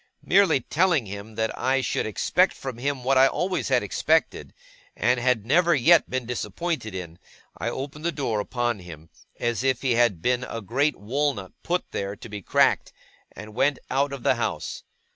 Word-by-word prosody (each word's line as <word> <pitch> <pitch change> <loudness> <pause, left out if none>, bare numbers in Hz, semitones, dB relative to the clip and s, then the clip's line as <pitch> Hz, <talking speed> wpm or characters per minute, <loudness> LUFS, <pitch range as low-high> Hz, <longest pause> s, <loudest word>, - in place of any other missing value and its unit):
Merely 180 -7 +4
telling 160 -2 +1
him 100 +2 -8
that 110 0 -1
I 135 +1 +1
should 120 -3 -1
expect 180 - +2
from 130 -3 -7
him 140 0 -2
what 130 +1 +3
I 135 - +7
always 180 +6 -1
had 125 -4 +2
expected, 100 - 0 0.4
and 125 +3 +2
had 120 -4 +1
never 170 +6 +4
yet 160 +6 +5
been 130 -1 -2
disappointed 120 - -3
in, 85 -2 -7 0.4
I - - -1
opened 140 +3 -6
the 170 - +2
door 135 -8 -2
upon 120 0 -1
him, 80 -3 -12 0.3
as 120 -1 -1
if 130 -1 +1
he 130 - +1
had 120 -7 +3
been 125 +6 0
a 115 - -5
great 135 +8 0
walnut 120 -3 -2
put 180 +2 -2
there 100 +1 -3
to 115 - -11
be 105 -1 -6
cracked, - - +2 0.4
and 110 0 -10
went 135 +4 +2
out 140 +1 +1
of 140 -3 -7
the - - +4
house. - - -3
125 Hz, 180 wpm, -25 LUFS, 110-140 Hz, 0.4 s, I